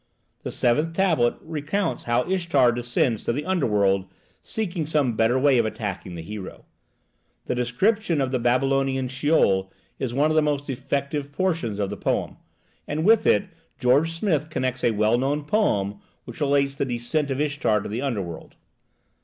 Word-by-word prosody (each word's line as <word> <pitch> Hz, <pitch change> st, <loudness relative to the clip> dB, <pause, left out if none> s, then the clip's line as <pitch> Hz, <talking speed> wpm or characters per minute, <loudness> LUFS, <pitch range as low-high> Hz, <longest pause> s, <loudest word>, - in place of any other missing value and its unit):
The -, -, -5 dB
seventh 150 Hz, +7 st, +1 dB
tablet 165 Hz, -11 st, +2 dB
recounts 160 Hz, +5 st, -2 dB
how 120 Hz, +1 st, +2 dB
Ishtar 170 Hz, -9 st, +3 dB
descends 120 Hz, -1 st, 0 dB
to -, -, 0 dB
the 145 Hz, +5 st, -3 dB
underworld 105 Hz, -, +1 dB, 0.3 s
seeking 175 Hz, -8 st, -3 dB
some 145 Hz, -7 st, +1 dB
better 115 Hz, +3 st, +2 dB
way 135 Hz, -1 st, +4 dB
of 115 Hz, -, +2 dB
attacking 100 Hz, -5 st, -5 dB
the 85 Hz, -, -7 dB
hero. 100 Hz, +1 st, -8 dB, 0.8 s
The -, -, -1 dB
description 165 Hz, -, +1 dB
of 135 Hz, -2 st, 0 dB
the 130 Hz, -, 0 dB
Babylonian 135 Hz, +1 st, +1 dB
Sheol 130 Hz, -9 st, +2 dB, 0.3 s
is 130 Hz, -3 st, -2 dB
one 145 Hz, +5 st, +2 dB
of -, -, 0 dB
the 155 Hz, -, +5 dB
most 145 Hz, -1 st, -1 dB
effective 140 Hz, +2 st, -3 dB
portions 160 Hz, -, -1 dB
of 100 Hz, -1 st, -2 dB
the 105 Hz, -, -5 dB
poem, -, -, -2 dB, 0.5 s
and 155 Hz, +3 st, -2 dB
with 220 Hz, +1 st, +5 dB
it -, -, +4 dB, 0.3 s
George 140 Hz, +6 st, +3 dB
Smith 165 Hz, -4 st, 0 dB
connects 130 Hz, -3 st, -2 dB
a -, -, +4 dB
well 110 Hz, +2 st, +2 dB
known 145 Hz, +3 st, -1 dB
poem 105 Hz, -, 0 dB, 0.3 s
which 120 Hz, +4 st, -10 dB
relates 140 Hz, -1 st, +2 dB
the 140 Hz, -, -2 dB
descent 130 Hz, +4 st, -1 dB
of 135 Hz, 0 st, -2 dB
Ishtar 145 Hz, -8 st, +1 dB
to -, -, -6 dB
the 110 Hz, +4 st, -3 dB
underworld. 100 Hz, -, -4 dB
135 Hz, 165 wpm, -24 LUFS, 120-155 Hz, 0.8 s, the